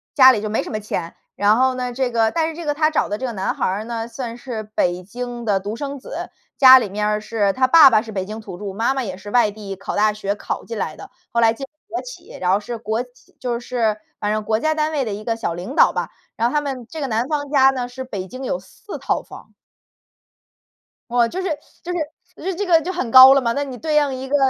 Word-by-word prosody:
家 260 Hz, -1 st, +9 dB
里 215 Hz, -, -1 dB
就 215 Hz, -, -3 dB
没 215 Hz, -, 0 dB
什 -, -, -8 dB
么 215 Hz, -, -3 dB
钱， 170 Hz, -5 st, -4 dB, 0.2 s
然 205 Hz, +2 st, +4 dB
后 260 Hz, +1 st, +3 dB
呢， 250 Hz, -1 st, -3 dB
这 255 Hz, 0 st, -1 dB
个 225 Hz, -1 st, +2 dB
但 325 Hz, -1 st, 0 dB
是 320 Hz, -, -7 dB
这 340 Hz, 0 st, -7 dB
个 295 Hz, -, +1 dB
她 310 Hz, +1 st, +2 dB
找 310 Hz, -, +1 dB
的 205 Hz, -, -2 dB
这 260 Hz, -, -4 dB
个 250 Hz, -, -2 dB
男 195 Hz, -4 st, -2 dB
孩 -, -, -1 dB
儿 195 Hz, +3 st, -1 dB
呢， 230 Hz, -1 st, -4 dB
算 235 Hz, -1 st, -6 dB
是 240 Hz, -3 st, -6 dB
北 175 Hz, 0 st, +1 dB
京 240 Hz, +4 st, -6 dB
的 200 Hz, -3 st, +2 dB
独 205 Hz, +3 st, -4 dB
生 285 Hz, +1 st, -5 dB
子， -, -, -7 dB, 0.3 s
家 260 Hz, -1 st, +10 dB
里 220 Hz, -5 st, -3 dB
面 210 Hz, +2 st, -1 dB
儿 210 Hz, 0 st, 0 dB
是， 210 Hz, -2 st, 0 dB
他 255 Hz, +3 st, +2 dB
爸 310 Hz, +1 st, +9 dB
爸 220 Hz, -4 st, +4 dB
是 220 Hz, -1 st, -9 dB
北 190 Hz, -3 st, -3 dB
京 215 Hz, +3 st, -7 dB
土 195 Hz, -4 st, -9 dB
著， 200 Hz, 0 st, -6 dB
妈 225 Hz, +6 st, +1 dB
妈 270 Hz, -, -2 dB
也 190 Hz, -5 st, -5 dB
是 200 Hz, +2 st, -10 dB
外 240 Hz, -2 st, +4 dB
地 200 Hz, -2 st, -7 dB
考 195 Hz, -, -5 dB
大 215 Hz, +1 st, +3 dB
学 200 Hz, -1 st, -2 dB
考 -, -, -5 dB
进 230 Hz, -, -6 dB
来 155 Hz, -6 st, -3 dB
的， -, -, -11 dB, 0.2 s
后 235 Hz, -, 0 dB
来 225 Hz, -1 st, +5 dB
进 250 Hz, -, -9 dB
了 -, -, -27 dB, 0.2 s
国 350 Hz, -, -4 dB
企。 -, -, -11 dB
然 180 Hz, 0 st, +2 dB
后 195 Hz, -, +3 dB
是 235 Hz, +3 st, -6 dB
国 220 Hz, +1 st, -2 dB
企 250 Hz, 0 st, -23 dB
就 240 Hz, -2 st, -2 dB
是 230 Hz, -4 st, 0 dB, 0.2 s
反 210 Hz, -, -1 dB
正 215 Hz, 0 st, -1 dB
国 220 Hz, +1 st, 0 dB
家 315 Hz, +4 st, +1 dB
单 305 Hz, 0 st, 0 dB
位 285 Hz, -4 st, -1 dB
的 215 Hz, -, -3 dB
一 210 Hz, +1 st, -6 dB
个 230 Hz, 0 st, -1 dB
小 225 Hz, -7 st, -2 dB
领 180 Hz, +9 st, -6 dB
导 -, -, +5 dB
吧。 -, -, -2 dB, 0.3 s
然 230 Hz, +1 st, +1 dB
后 -, -, -6 dB
他 300 Hz, -, +3 dB
们 265 Hz, -4 st, -5 dB
这 320 Hz, -, -7 dB
个 275 Hz, -, -1 dB
男 230 Hz, +1 st, -1 dB
方 290 Hz, -2 st, -2 dB
家 270 Hz, -2 st, +5 dB
呢， 255 Hz, -2 st, -2 dB
是 255 Hz, +1 st, -7 dB
北 200 Hz, -7 st, -6 dB
京 255 Hz, +8 st, -8 dB
有 215 Hz, -8 st, -2 dB
4 190 Hz, -, -10 dB
套 -, -, -1 dB
房。 -, -, -14 dB, 1.6 s
哦， 240 Hz, -1 st, +3 dB
就 365 Hz, +10 st, -4 dB
是 380 Hz, -, -2 dB, 0.4 s
就 355 Hz, -, -4 dB
是， 355 Hz, +2 st, -5 dB
就 -, -, -8 dB
这 405 Hz, +2 st, -3 dB
个 335 Hz, -2 st, +6 dB
就 360 Hz, -, -3 dB
很 300 Hz, -10 st, -3 dB
高 260 Hz, +2 st, +10 dB
了 275 Hz, -, +3 dB
嘛。 235 Hz, -2 st, 0 dB
那 285 Hz, -, -1 dB
你 270 Hz, -3 st, -7 dB
对 310 Hz, -1 st, -1 dB
应 290 Hz, -2 st, +3 dB
一 260 Hz, +1 st, -6 dB
个 290 Hz, -, +2 dB
240 Hz, 295 characters per minute, -21 LUFS, 210-270 Hz, 1.6 s, 家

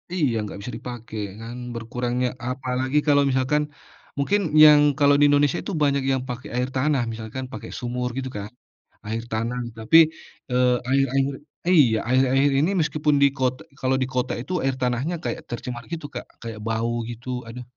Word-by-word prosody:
Iya 145 Hz, -10 st, +1 dB
nggak 105 Hz, -, -7 dB
bisa 125 Hz, -, -6 dB
dipake 120 Hz, -3 st, -8 dB, 0.3 s
kan 115 Hz, +2 st, -7 dB, 0.2 s
berkurangnya 125 Hz, +2 st, -2 dB, 0.2 s
apalagi 130 Hz, +1 st, -1 dB
kalau 145 Hz, -1 st, +5 dB
misalkan, 130 Hz, +3 st, +1 dB, 0.6 s
mungkin 195 Hz, +9 st, +2 dB, 0.2 s
yang 150 Hz, -1 st, +9 dB, 0.2 s
kalau 145 Hz, 0 st, +5 dB
di 145 Hz, -, +5 dB
Indonesia 145 Hz, -1 st, +3 dB
itu 200 Hz, -, -4 dB
banyak 140 Hz, -1 st, +2 dB
yang 130 Hz, -, +1 dB
pakai 125 Hz, +1 st, -6 dB
air 125 Hz, +1 st, 0 dB
tanah 135 Hz, -1 st, +2 dB
misalkan 110 Hz, +3 st, -6 dB
pakai -, -, -7 dB
sumur 125 Hz, 0 st, -2 dB
gitu 130 Hz, -1 st, -3 dB
kan, 100 Hz, -, -5 dB, 0.6 s
air 115 Hz, +2 st, -3 dB
tanah 115 Hz, +3 st, -2 dB, 0.2 s
tapi, 110 Hz, +9 st, +4 dB, 0.5 s
eee, 125 Hz, 0 st, +3 dB, 0.2 s
air 135 Hz, 0 st, +4 dB
air 135 Hz, 0 st, +3 dB, 0.5 s
iya 135 Hz, -11 st, +5 dB
air 130 Hz, +1 st, +5 dB
air 140 Hz, +1 st, +4 dB
ini 155 Hz, +5 st, +2 dB
meskipun 150 Hz, -2 st, +1 dB
di 140 Hz, -, +7 dB
kot 130 Hz, -1 st, +1 dB, 0.2 s
kalau 130 Hz, 0 st, +1 dB
di 130 Hz, -, +1 dB
kota 125 Hz, 0 st, 0 dB
itu 130 Hz, -, -9 dB
air 135 Hz, -1 st, +1 dB
tanahnya 125 Hz, +7 st, 0 dB
kayak -, -, -3 dB
tercemar 120 Hz, 0 st, -5 dB
gitu 165 Hz, -3 st, -4 dB
Kak 120 Hz, -, -5 dB, 0.2 s
kayak 115 Hz, -2 st, -7 dB
bau 115 Hz, +1 st, 0 dB, 0.2 s
gitu 120 Hz, +1 st, -9 dB, 0.2 s
aduh. 120 Hz, +2 st, -8 dB
130 Hz, 175 wpm, -24 LUFS, 120-140 Hz, 0.6 s, yang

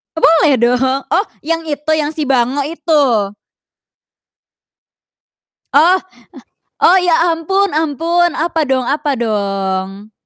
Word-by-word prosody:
Boleh 320 Hz, -2 st, +4 dB
do 245 Hz, +1 st, +3 dB, 0.3 s
oh 385 Hz, +5 st, +1 dB, 0.2 s
yang 330 Hz, +1 st, -3 dB
itu, 300 Hz, +1 st, -3 dB
yang 300 Hz, 0 st, -2 dB
si 310 Hz, -, -5 dB
bango 255 Hz, +2 st, +1 dB
itu? 280 Hz, -9 st, 0 dB, 2.4 s
Oh, 335 Hz, +6 st, +5 dB, 0.8 s
o -, -, +4 dB
ya 335 Hz, -1 st, +2 dB
ampun 385 Hz, +2 st, -1 dB
ampun, 330 Hz, +3 st, 0 dB
apa 325 Hz, 0 st, -1 dB
dong 265 Hz, -3 st, -1 dB
apa 285 Hz, -2 st, -1 dB
dong? 195 Hz, -2 st, -3 dB
295 Hz, 105 wpm, -15 LUFS, 240-330 Hz, 2.4 s, Oh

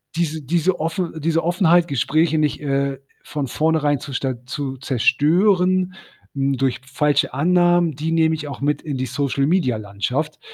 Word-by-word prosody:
diese 160 Hz, -2 st, -1 dB
diese 170 Hz, +6 st, 0 dB
Offen 165 Hz, +2 st, -2 dB
diese 165 Hz, +2 st, +1 dB
Offenheit, 175 Hz, 0 st, +3 dB
Gespräche 155 Hz, +3 st, +1 dB
nicht, 150 Hz, -1 st, 0 dB
äh, 140 Hz, -1 st, -1 dB, 0.3 s
von 145 Hz, -2 st, -3 dB
vornherein 150 Hz, +1 st, +1 dB
zu 140 Hz, -, -8 dB
sta 130 Hz, -2 st, -3 dB
zu 135 Hz, +1 st, -4 dB
zerstören, 180 Hz, -, +2 dB, 0.4 s
hm, 135 Hz, -1 st, 0 dB
durch 130 Hz, -1 st, -1 dB
falsche 145 Hz, +2 st, +1 dB
Annahmen, 175 Hz, +2 st, +3 dB
die 155 Hz, +4 st, -3 dB
nehme 160 Hz, -1 st, +3 dB
ich 150 Hz, -1 st, -6 dB
auch 140 Hz, -, -7 dB
mit 145 Hz, +1 st, 0 dB
in 145 Hz, -4 st, -4 dB
die 130 Hz, -, -2 dB
Social-Media-Landschaft. 135 Hz, -, -1 dB
150 Hz, 150 wpm, -21 LUFS, 135-165 Hz, 0.4 s, Offenheit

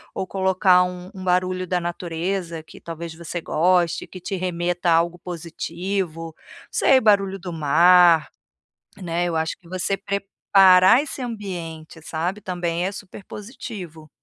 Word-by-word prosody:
ou -, -, -2 dB
colocar 190 Hz, -1 st, +3 dB
um 180 Hz, +1 st, -8 dB
um 190 Hz, -, -9 dB
barulho 185 Hz, 0 st, 0 dB
da 180 Hz, 0 st, 0 dB
natureza 170 Hz, 0 st, -4 dB
que, -, -, -15 dB
talvez, 165 Hz, 0 st, -7 dB
você 170 Hz, +1 st, -6 dB
goste, 175 Hz, +1 st, +1 dB
que 185 Hz, -, -11 dB
te 195 Hz, -, -4 dB
remeta 175 Hz, 0 st, -1 dB
a -, -, +6 dB
algo 170 Hz, +1 st, 0 dB
positivo, 170 Hz, 0 st, -4 dB
não -, -, -18 dB
sei, 265 Hz, -, +4 dB
o -, -, -8 dB
barulho 195 Hz, -3 st, +3 dB
do 180 Hz, -1 st, -7 dB
mar, 170 Hz, +1 st, +5 dB, 0.7 s
né, 175 Hz, -2 st, -2 dB
eu 170 Hz, -1 st, -2 dB
acho 160 Hz, 0 st, -2 dB
que 170 Hz, -, -20 dB
você 185 Hz, +2 st, -1 dB
preparar 195 Hz, +2 st, +4 dB
esse 290 Hz, -2 st, -7 dB
ambiente, 175 Hz, -9 st, -6 dB
sabe, 170 Hz, +6 st, -3 dB
também 175 Hz, -2 st, -2 dB
é 195 Hz, -, -3 dB
super 200 Hz, 0 st, -10 dB
positivo. 200 Hz, -, -9 dB
180 Hz, 150 wpm, -22 LUFS, 170-190 Hz, 0.7 s, a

